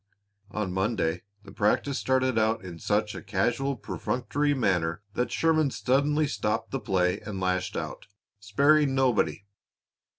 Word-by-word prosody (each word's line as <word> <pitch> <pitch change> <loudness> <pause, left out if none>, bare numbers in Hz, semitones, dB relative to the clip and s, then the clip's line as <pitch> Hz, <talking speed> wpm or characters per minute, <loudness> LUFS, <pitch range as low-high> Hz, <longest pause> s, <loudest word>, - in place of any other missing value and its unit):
On 100 -3 -3
Monday 95 -4 0 0.2
the 100 - -12
practice 105 +7 +1
started 130 -1 +1
out 110 -2 +1
in 85 -2 -8
such 105 +3 0
a - - -7
casual, 120 +8 0
perfunctory 145 +5 -1
manner 90 -7 0
that 125 - -1
Sherman 155 -3 +2
suddenly 140 +4 +1
stopped 110 -5 -2
the 135 - -2
play 95 -3 +1
and 100 -3 -6
lashed 90 0 -1
out, - - -6 0.3
sparing 140 +7 +3
nobody. 125 -6 +1
110 Hz, 135 wpm, -27 LUFS, 95-135 Hz, 0.3 s, sparing